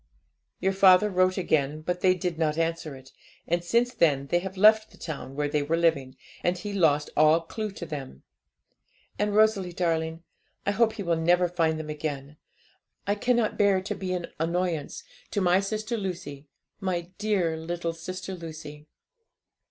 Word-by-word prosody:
'Your 190 +1 +1
father 190 +1 +6
wrote 185 0 +2
again; 155 -4 0
but 180 +3 -3
they 185 -1 +4
did 175 -2 -3
not 155 -1 +1
answer 165 -3 -2
it, 130 0 -14 0.4
and 175 +1 0
since 235 +7 +1
then 145 - +2
they 175 - +3
have 190 +1 -7
left 215 +2 +6
the - - -19
town 140 -4 -7
where 145 0 0
they 145 0 0
were 160 +3 0
living, 145 -6 +1 0.3
and 175 +1 +1
he 205 +3 -6
lost 150 -6 +2
all 155 +2 +5
clue 215 +6 -5
to 175 - -7
them. 140 - -7 1.0
And, 210 0 0
Rosalie 210 -4 +3
darling, 165 -1 -1 0.4
I 200 - +2
hope 220 +1 +2
he 215 -2 -5
will 170 -2 +1
never 175 +2 +3
find 165 -2 0
them 155 -1 -5
again. 150 -1 -5 0.7
I 200 - +1
cannot 235 +1 0
bear 200 -2 +4
to 190 - -4
be 185 -1 -5
an 175 -1 -2
annoyance 170 -2 -2 0.3
to - - -1
my 180 -1 +4
sister 215 +4 -3
Lucy 175 -8 -6 0.3
my 180 -2 -3
dear 195 -6 +1
little 170 +1 -3
sister 185 +3 -6
Lucy. 155 -3 -9
175 Hz, 170 wpm, -27 LUFS, 155-195 Hz, 1.0 s, father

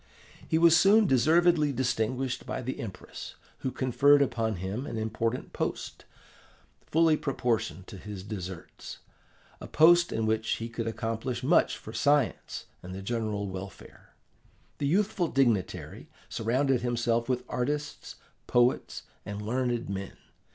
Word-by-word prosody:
He 160 - +2
was 165 0 +6
soon 210 +4 +6
deservedly 160 +2 +4
distinguished 125 0 -1
by 130 - -3
the 130 +2 -4
Empress, 100 -5 -8 0.2
who 130 - -2
conferred 140 +3 +4
upon 115 -5 -1
him 95 +9 -4
an - - -4
important 110 +2 -2
post, - - -4 0.8
fully 160 0 +4
proportioned 115 -9 -2
to 95 - -10
his 100 -2 -8
deserts 95 -4 -7 0.6
a - - -8
post 170 +2 +5
in 110 - -1
which 110 0 0
he 115 +1 -5
could 115 -1 -4
accomplish 115 +3 -3
much 155 +7 +3
for 110 - -10
science 140 +2 +1 0.2
and 90 +1 -8
the 95 - -7
general 110 -2 -2
welfare. 95 0 -10 0.6
The 140 - 0
youthful 185 +1 +1
dignitary 105 - 0 0.2
surrounded 125 +3 +1
himself 120 -1 0
with 125 -1 0
artists, 150 +4 -3 0.3
poets, 120 +1 +1 0.2
and 100 0 -6
learned 120 +2 -1
men. 100 0 -5
120 Hz, 130 wpm, -28 LUFS, 110-140 Hz, 0.8 s, was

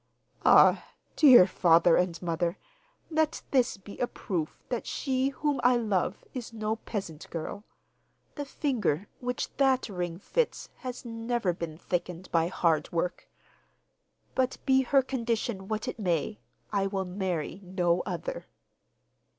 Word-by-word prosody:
'Ah, - - +7 0.3
dear 255 - +9
father 170 -2 +4
and 175 -2 +1
mother, 170 +2 -1 0.5
let 315 0 +1
this 255 -5 +2
be 200 +1 -12
a 245 - +1
proof 170 -11 -4
that 245 -3 -3
she 265 -1 0
whom 285 +1 -1
I 250 0 +5
love 210 -6 -1
is 245 -3 -6
no 220 -1 -2
peasant 190 -9 -6
girl. 170 +6 -5 0.7
The 290 - -4
finger 215 - -1
which 250 -1 -3
that 265 -3 +3
ring 175 -3 -3
fits 470 - -1
has 250 -1 -7
never 230 -4 -1
been 165 -2 -6
thickened 180 +1 -4
by 165 -1 +3
hard 165 -4 +1
work. 175 +1 -2 1.0
But 260 0 0
be 265 -1 +5
her 270 +1 +3
condition 230 -6 -2
what 215 0 -3
it - - -4
may, 185 +2 -1 0.3
I 195 -1 +2
will 195 -1 -2
marry 180 -1 -3
no 180 -1 +1
other. - - -5
205 Hz, 135 wpm, -29 LUFS, 175-250 Hz, 1.0 s, dear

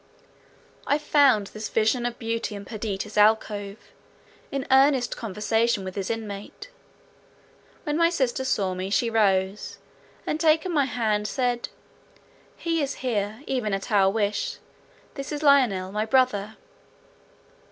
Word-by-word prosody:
I 285 - +3
found 280 -8 +3
this 215 0 -5
vision 230 +2 +1
of 240 0 -6
beauty 230 -2 -3
in 200 0 -8
Perdita's 210 -1 -4
alcove, 210 -1 +2 0.7
in 275 -1 -3
earnest 265 -2 +4
conversation 220 0 0
with 185 -1 -7
its 195 -1 -3
inmate. 215 - -6 1.1
When 295 0 -1
my 335 0 +4
sister 265 -6 -1
saw 195 -7 0
me, 185 +1 -4
she 230 +3 +1
rose, 195 -2 +1 0.5
and 305 - -2
taking 320 +2 +2
my 285 -3 +3
hand, 215 -5 -1
said, 245 -1 -1 0.9
"He 330 -1 -1
is 280 -1 -2
here, 215 +1 -2
even 220 -7 -1
at 195 - -6
our 195 -2 +4
wish; 205 0 -1 0.6
this 275 0 -6
is 300 0 -4
Lionel, 240 -11 +3
my 210 +2 -2
brother." 220 -4 +1
225 Hz, 130 wpm, -25 LUFS, 205-265 Hz, 1.1 s, earnest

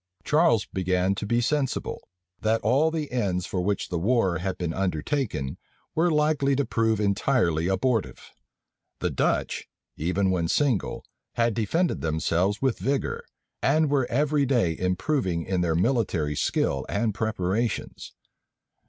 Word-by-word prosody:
Charles 150 -8 +3
began 95 0 0
to 105 +1 -4
be 120 +2 +2
sensible, 135 +1 -1 0.4
that 110 +1 +1
all 135 +9 +3
the 160 -2 -3
ends 95 -8 -1
for 90 - -2
which 100 +2 -1
the 85 - -1
war 95 -4 +2
had 95 +2 -3
been 85 -2 -2
undertaken 90 - -2 0.3
were 170 +2 +2
likely 150 -3 +2
to 140 0 +1
prove 115 -2 +1
entirely 100 - +1
abortive. 110 +3 -1 0.7
The - - -1
Dutch, - - -1 0.3
even 95 +4 +1
when 85 -3 0
single, 130 - 0 0.3
had 115 -1 +1
defended 160 - 0
themselves 85 +7 0
with 130 -3 +1
vigor, 135 0 -1 0.4
and 150 +1 +2
were 135 -4 +2
every 145 +1 +1
day 115 -11 +2
improving 90 - -1
in 95 -2 0
their 85 -2 +1
military 90 - +1
skill 70 -1 0
and 110 +1 0
preparations. 110 +1 -2
110 Hz, 135 wpm, -26 LUFS, 90-135 Hz, 0.7 s, Charles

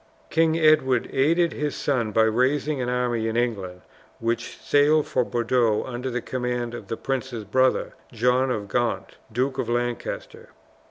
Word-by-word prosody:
King 160 0 +3
Edward 155 -6 +3
aided 165 +5 +2
his 150 -1 -2
son 120 -6 0
by 110 - +4
raising 130 +5 +1
an 125 - -1
army 120 -2 0
in 110 +1 -1
England, 100 -7 -2 0.4
which 115 +1 -2
sailed 150 +1 +3
for 125 - +1
Bordeaux 120 -2 +1
under 125 +1 -4
the 125 -1 -3
command 125 -2 -3
of 115 -4 -8
the 115 - -4
prince's 125 -4 -3
brother, 130 +5 +1 0.2
John 125 +3 +2
of 105 -5 -2
Gaunt, 110 -4 -2
Duke 130 +4 -1
of 115 - -2
Lancaster. 120 0 -3
125 Hz, 155 wpm, -24 LUFS, 115-135 Hz, 0.4 s, by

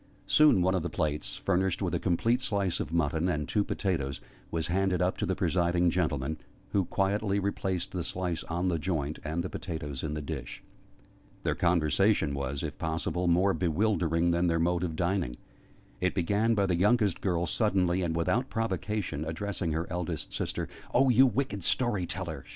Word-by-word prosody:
Soon 150 -12 +5
one 95 +1 +2
of 95 - +1
the 85 - -3
plates, 75 -7 -2
furnished 95 -1 0
with - - -1
a - - +1
complete 115 +8 +1
slice 100 -6 -1
of - - -3
mutton 85 +1 +1
and 75 -4 -1
two 105 - +1
potatoes, 75 -11 -2 0.3
was 80 -1 -1
handed 90 +1 +1
up 90 +1 +1
to - - -2
the - - 0
presiding 85 -1 +2
gentleman, 80 -4 -1 0.3
who 100 -3 +2
quietly 100 +2 0
replaced 95 -3 -2
the 90 -2 -3
slice 90 -1 -2
on 85 +2 -1
the 85 -3 +1
joint, 75 -3 -2
and 80 +3 -2
the 95 - -4
potatoes 75 -6 -5
in 75 -1 -3
the 75 - -3
dish. 70 -5 -6 0.8
Their - - +1
conversation 85 0 +2
was, 70 +1 -3
if 75 -2 -5
possible, 80 +2 -1
more 90 +3 +4
bewildering 85 -2 +1
than 85 +1 +2
their 85 -1 +2
mode 85 +1 +1
of 80 -3 -2
dining. 85 -7 0 0.6
It 90 0 0
began 105 +5 +2
by 100 -2 +2
the 90 -2 +1
youngest 105 0 +2
girl 85 -3 0
suddenly, 95 -1 +1
and 85 -2 -1
without 120 +10 +1
provocation, 105 -7 -2
addressing 85 +2 -3
her 80 +2 -1
eldest 90 -3 -3
sister. - - -2 0.3
"Oh, 135 +1 +5
you 130 +2 +6
wicked 120 -5 -2
story 105 -7 +1
teller!" 80 -8 -4
90 Hz, 180 wpm, -29 LUFS, 80-100 Hz, 0.8 s, you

